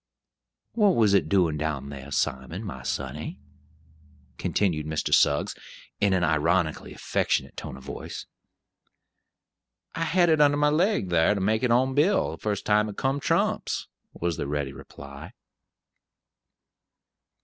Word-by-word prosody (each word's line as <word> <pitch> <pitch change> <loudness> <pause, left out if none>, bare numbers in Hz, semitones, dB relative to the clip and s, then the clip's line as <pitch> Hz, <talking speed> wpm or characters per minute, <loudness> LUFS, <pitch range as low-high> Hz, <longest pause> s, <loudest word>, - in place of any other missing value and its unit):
"What 210 -5 +3
was 105 -3 +4
it 100 - +3
doin' 90 -6 +2
down 70 -3 -3
thar, 70 0 -9
Simon, 70 - -2
my 65 - -6
sonny?" 70 +4 -4 1.0
continued 80 -7 0
Mr. 80 -1 -1
Suggs, 70 0 +3 0.5
in 100 -1 +3
an 90 -2 +2
ironically 80 +1 +1
affectionate - - -1
tone - - -7
of 65 - -13
voice. - - -7 1.7
"I 165 - -2
had 175 +2 +3
it 155 -1 +4
under 145 0 +5
my 150 0 +3
leg, 160 - +1
thar 85 +4 +3
to - - -2
make 110 +3 +1
it 125 - +1
on 130 +3 +3
Bill, 160 +9 +2
the 80 - -7
first 105 -2 -3
time 105 0 +3
it 100 - -9
come 135 +1 0
trumps," - - 0 0.2
was 85 -2 -3
the - - -3
ready 70 -1 -2
reply. - - -11
95 Hz, 140 wpm, -26 LUFS, -, 1.7 s, under